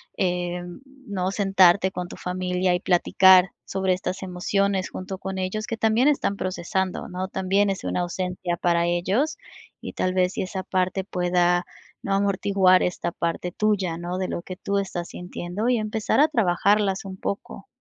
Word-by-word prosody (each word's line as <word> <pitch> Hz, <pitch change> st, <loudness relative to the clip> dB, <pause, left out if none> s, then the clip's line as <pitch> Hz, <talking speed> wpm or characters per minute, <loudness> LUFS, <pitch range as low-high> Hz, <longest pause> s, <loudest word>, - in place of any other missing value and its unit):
em, 175 Hz, -1 st, -2 dB, 0.3 s
¿no?, 190 Hz, -3 st, -1 dB
sentarte 195 Hz, -2 st, +4 dB
con 180 Hz, -1 st, -5 dB
tu -, -, -9 dB
familia 180 Hz, 0 st, -1 dB
y 180 Hz, -, +1 dB
platicar 185 Hz, +1 st, +5 dB, 0.2 s
sobre 190 Hz, -1 st, -1 dB
estas 185 Hz, +1 st, -4 dB
emociones 190 Hz, +1 st, 0 dB
junto 190 Hz, +1 st, -6 dB
con 190 Hz, 0 st, -5 dB
ellos, 215 Hz, +4 st, -3 dB
que 230 Hz, -, -2 dB
también 225 Hz, +4 st, +2 dB
están 275 Hz, -9 st, +1 dB
procesando, 185 Hz, 0 st, -2 dB
¿no? 185 Hz, +1 st, -4 dB
También 190 Hz, +2 st, +1 dB
es 195 Hz, -1 st, -3 dB
una -, -, -1 dB
ausencia 180 Hz, 0 st, -3 dB
para 170 Hz, 0 st, +2 dB
ellos 190 Hz, -, 0 dB, 0.4 s
y -, -, -6 dB
tal 185 Hz, -, -1 dB
vez, 185 Hz, 0 st, +1 dB
si -, -, -2 dB
esa 185 Hz, 0 st, -5 dB
parte 185 Hz, +1 st, -1 dB
pueda, 180 Hz, -1 st, +1 dB, 0.4 s
¿no? 200 Hz, -, -1 dB
Amortiguar 195 Hz, -1 st, +3 dB
esta 180 Hz, -1 st, -2 dB
parte 170 Hz, +1 st, -3 dB
tuya, 195 Hz, -4 st, 0 dB
¿no?, 175 Hz, +1 st, -4 dB
de 185 Hz, -, -1 dB
lo -, -, -3 dB
que 185 Hz, -, -7 dB
tú 200 Hz, +1 st, -2 dB
estás 180 Hz, -3 st, -3 dB
sintiendo 180 Hz, +5 st, -4 dB
y 250 Hz, -, +3 dB
empezar 215 Hz, +2 st, 0 dB
a 300 Hz, -, +6 dB
trabajarlas 200 Hz, -, +2 dB
un 190 Hz, -1 st, -7 dB
poco. 200 Hz, 0 st, -5 dB
185 Hz, 170 wpm, -24 LUFS, 180-200 Hz, 0.4 s, a